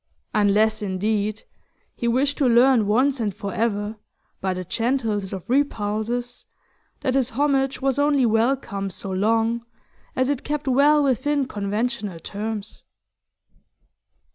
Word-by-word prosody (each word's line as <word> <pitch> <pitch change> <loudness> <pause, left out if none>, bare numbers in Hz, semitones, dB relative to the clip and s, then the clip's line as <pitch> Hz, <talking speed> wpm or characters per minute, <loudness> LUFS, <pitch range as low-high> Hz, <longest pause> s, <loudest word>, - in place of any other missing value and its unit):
Unless, 215 +1 +3
indeed, 210 +2 -1 0.5
he 235 - -2
wished 275 +5 +1
to 270 -4 +3
learn 240 -2 +5
once 260 +6 +2
and 210 -5 -1
for 200 -2 -5
ever, 215 -1 -1 0.4
by 190 - -1
the 185 - -4
gentlest 225 -2 -1
of 190 0 -6
repulses, 240 -2 -1 0.5
that 260 - 0
his 260 -2 +1
homage 270 +1 0
was 270 0 +1
only 285 -3 +3
welcome 225 -3 0
so 195 +1 -7
long 225 +4 +1 0.5
as 260 0 +1
it 280 -2 -1
kept 295 0 -3
well 290 +3 +4
within 280 +2 +1
conventional 210 -3 -3
terms. 210 +3 -6
230 Hz, 125 wpm, -23 LUFS, 205-270 Hz, 0.5 s, learn